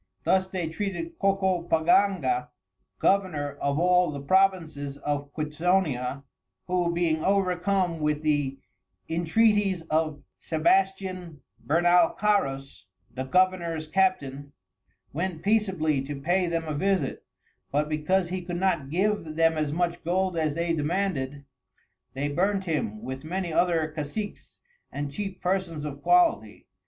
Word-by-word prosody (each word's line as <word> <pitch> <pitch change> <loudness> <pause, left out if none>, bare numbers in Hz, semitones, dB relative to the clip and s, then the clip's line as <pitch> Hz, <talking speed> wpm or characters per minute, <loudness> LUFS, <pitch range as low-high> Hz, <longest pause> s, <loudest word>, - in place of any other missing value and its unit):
Thus 190 0 +2
they 185 -3 -3
treated 205 - -4
Cocopaganga, 180 -7 +2 0.5
Governour 175 - +1
of 140 0 0
all 180 +1 +4
the 145 -1 -5
Provinces 160 -4 +1
of 145 0 -3
Quitonia, 150 -4 -1 0.4
who 180 -1 0
being 165 -2 0
overcome 185 -2 +1
with 150 0 -1
the 145 -3 0 0.5
Intreaties 190 +2 +2
of 155 -2 0 0.2
Sebastian 185 -1 0 0.3
Bernalcarus, 170 -3 +2 0.3
the 130 +1 -4
Governours 170 0 +1
Captain, 145 -6 0 0.6
went 170 +1 -3
peaceably 190 -9 +1
to 145 0 -5
pay 175 +5 +1
them 165 -1 -1
a 155 - -2
Visit; 190 +5 0 0.5
but 150 +2 +1
because 170 +4 0
he 185 0 -3
could 175 0 -4
not 170 -7 0
give 180 -2 0
them 165 0 +3
as 155 -2 -1
much 175 +2 -1
Gold 185 +2 0
as 155 -3 0
they 170 0 0
demanded, 150 -4 -2 0.7
they 140 +2 -1
burnt 190 +6 0
him 145 - -2
with 130 +2 -6
many 175 +1 -3
other 160 -3 +1
Casics 165 +8 -6 0.3
and 145 0 -4
Chief 195 +4 -5
Persons 180 -5 -1
of 140 -1 -6
Quality. 355 -2 +2
170 Hz, 125 wpm, -26 LUFS, 150-190 Hz, 0.7 s, all